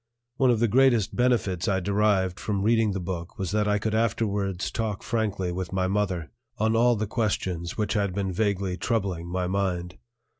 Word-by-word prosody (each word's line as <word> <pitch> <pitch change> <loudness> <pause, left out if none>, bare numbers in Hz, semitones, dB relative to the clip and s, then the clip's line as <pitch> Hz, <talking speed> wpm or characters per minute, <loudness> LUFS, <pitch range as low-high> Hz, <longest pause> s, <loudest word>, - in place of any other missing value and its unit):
One 135 -2 +4
of 120 -3 +3
the 120 - +3
greatest 120 -2 +3
benefits 115 -8 +1
I 95 -1 +2
derived 100 -2 +1
from 100 -2 -2
reading 110 -1 +3
the 95 - -2
book 85 -1 -5
was 95 -2 -3
that 105 0 +1
I 105 0 +2
could 110 +1 -2
afterwards 100 -4 0
talk 110 -3 -3
frankly 105 -5 -1
with 90 0 -4
my 95 0 0
mother 95 -4 -1 0.3
on 110 +1 +1
all 120 +1 +4
the 110 0 -1
questions 95 -6 -2
which 105 -2 0
had 100 -3 0
been 95 0 -2
vaguely 100 -2 0
troubling 95 -8 -1
my 90 +1 -2
mind. 90 -2 -2
100 Hz, 185 wpm, -26 LUFS, 95-110 Hz, 0.3 s, One